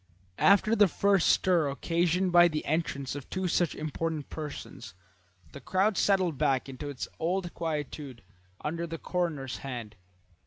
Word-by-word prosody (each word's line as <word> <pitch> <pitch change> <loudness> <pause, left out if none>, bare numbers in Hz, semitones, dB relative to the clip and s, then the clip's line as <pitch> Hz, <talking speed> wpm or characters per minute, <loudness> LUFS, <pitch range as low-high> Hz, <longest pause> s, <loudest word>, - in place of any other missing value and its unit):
After 205 +3 +5
the 205 -2 +6
first 195 0 +2
stir 170 -6 +3
occasioned 175 +5 0
by 175 0 +7
the 155 -2 -3
entrance 140 -4 -1
of 140 -2 -8
two 185 -1 -2
such 175 -1 +1
important 155 0 -3
persons 150 - -7 0.6
the 140 - -10
crowd 190 - +1
settled 185 -8 +2
back 135 -4 +1
into 135 +2 -6
its 140 -3 -5
old 175 +1 -1
quietude 150 -5 -4 0.4
under 170 +3 -3
the 165 0 -5
coroner's 160 -8 -2
hand. 120 -6 -6
165 Hz, 145 wpm, -29 LUFS, 140-180 Hz, 0.6 s, by